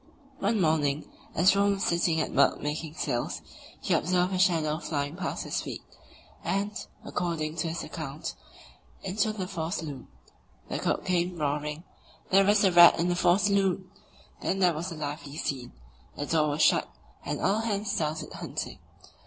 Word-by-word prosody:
One 210 +2 +1
morning, 155 -4 +1 0.3
as 180 +3 +6
Rönne 200 0 +3
was 195 - -3
sitting 170 -1 +2
at - - -3
work - - +4
making 150 +1 -4
sails, 120 -8 -2 0.4
he - - 0
observed 180 +1 +2
a 185 - 0
"shadow" 160 -5 +2
flying 145 -2 -2
past 190 0 -3
his - - -2
feet, - - -6 0.6
and, 200 +1 0 0.3
according 165 -3 -2
to 165 - 0
his 165 +1 -3
account, 155 -3 -5 0.7
into 205 +3 0
the 205 -3 -4
fore 165 -3 -3
saloon. 145 - -5 0.6
The - - -2
cook - - -1
came 180 -1 0
roaring: 150 +1 -2 0.5
"There's 195 +2 +5
a 190 - +5
rat 175 0 +9
in 170 +1 +2
the 175 - +1
fore 175 +1 +4
saloon!" 195 -2 +1 0.5
Then 195 - 0
there 180 -3 +4
was 170 +4 -4
a - - -5
lively 145 -1 -5
scene; 130 -6 -3 0.4
the 145 - -3
door 155 -1 +2
was 145 +2 +1
shut, - - +4 0.3
and - - -3
all 200 +3 +2
hands 210 -2 -1
started 155 0 -2
hunting. - - -5
170 Hz, 165 wpm, -28 LUFS, 155-190 Hz, 0.7 s, rat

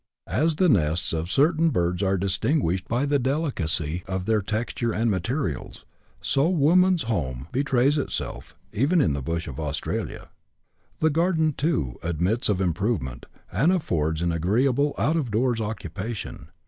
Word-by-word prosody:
As 160 0 +1
the 185 +3 +3
nests 85 - +2
of 80 +3 -2
certain 160 +3 +3
birds 90 - 0
are 95 -1 +2
distinguished 95 - 0
by 120 +5 0
the 145 0 +2
delicacy 90 - -1
of 95 -1 -3
their 110 -1 +2
texture 115 +3 -2
and 115 +1 +1
materials, 95 - -3 0.4
so 140 +4 +2
woman's 180 +2 +4
home 70 - -2
betrays 135 +1 +2
itself, - - -5 0.2
even 145 - +2
in 80 - +3
the 70 - -3
bush 85 +5 -3
of 70 -2 -7
Australia. 75 -1 -4 0.7
The 160 0 +4
garden, 160 -1 +2
too, 130 - -1
admits 85 +8 0
of 100 -3 +1
improvement, 85 - -1 0.2
and 160 +7 +3
affords 80 - 0
an 85 - +1
agreeable 125 - +1
out 160 +3 +1
of 140 -7 -1
doors 115 +2 +1
occupation. 110 0 -5
110 Hz, 150 wpm, -25 LUFS, 85-145 Hz, 0.7 s, woman's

